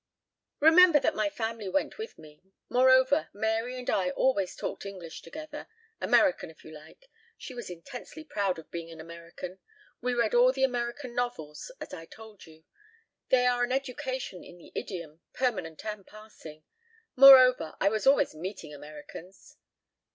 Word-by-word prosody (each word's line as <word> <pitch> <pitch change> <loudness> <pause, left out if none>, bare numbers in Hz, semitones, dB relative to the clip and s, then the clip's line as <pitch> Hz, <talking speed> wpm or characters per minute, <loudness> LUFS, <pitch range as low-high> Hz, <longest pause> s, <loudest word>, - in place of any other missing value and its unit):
"Remember 325 +1 +7
that - - +1
my 215 -1 0
family 225 -1 -4
went 290 - -1
with 445 - -7
me. 150 -1 -16 0.3
Moreover, 260 +3 +4
Mary 225 +4 -1
and 250 - -8
I 185 -2 +1
always 195 -1 0
talked - - -5
English 185 -5 -8
together 300 - -9 0.3
American 280 - +2
if 160 - -17
you 155 - -12
like. 155 - -15 0.3
She 260 - -9
was 240 -5 -7
intensely 245 - -9
proud 200 - -1
of 160 - -12
being 170 -1 -6
an 165 -1 -11
American. 170 +3 -9 0.4
We 250 0 -1
read 235 -2 +1
all 245 +1 +6
the 265 0 -1
American 245 0 -2
novels, 240 - -4
as - - -9
I 165 0 -8
told 220 -2 -14
you. 160 0 -17 0.7
They 250 -1 +4
are 245 0 +2
an 245 - -1
education 260 -6 -4
in 175 - -13
the 175 - -16
idiom, 170 -4 -6
permanent 190 -12 -2
and 210 -2 -5
passing. 190 -8 -13 0.5
Moreover, 255 -9 +8
I 195 - +3
was 215 +4 -2
always 275 - +4
meeting 165 -1 -7
Americans." 150 +5 -12
220 Hz, 160 wpm, -28 LUFS, 170-255 Hz, 0.7 s, Moreover